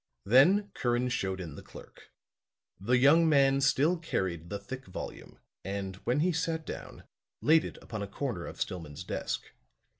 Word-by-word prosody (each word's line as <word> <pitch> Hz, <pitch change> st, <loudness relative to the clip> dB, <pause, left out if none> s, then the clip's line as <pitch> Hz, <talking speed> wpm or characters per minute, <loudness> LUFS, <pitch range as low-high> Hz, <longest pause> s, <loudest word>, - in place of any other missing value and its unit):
Then 185 Hz, -, +5 dB
Curran 120 Hz, 0 st, 0 dB
showed 95 Hz, -5 st, -2 dB
in 85 Hz, -5 st, -6 dB
the -, -, -9 dB
clerk. -, -, -14 dB, 0.7 s
The 120 Hz, +6 st, +2 dB
young 160 Hz, +6 st, +6 dB
man 135 Hz, -2 st, +4 dB
still 150 Hz, +5 st, +3 dB
carried 85 Hz, -, -2 dB
the 100 Hz, -, -3 dB
thick 130 Hz, +5 st, -8 dB
volume 90 Hz, -, -8 dB, 0.3 s
and, 95 Hz, 0 st, -4 dB
when 125 Hz, +8 st, 0 dB
he 180 Hz, +3 st, +3 dB
sat 160 Hz, 0 st, -2 dB
down, -, -, -8 dB, 0.4 s
laid 160 Hz, +1 st, +5 dB
it -, -, -7 dB
upon 110 Hz, -3 st, -6 dB
a 100 Hz, -, -3 dB
corner 100 Hz, -4 st, -4 dB
of -, -, -9 dB
Stillman's 80 Hz, -5 st, -4 dB
desk. -, -, -3 dB
125 Hz, 160 wpm, -30 LUFS, 95-150 Hz, 0.7 s, young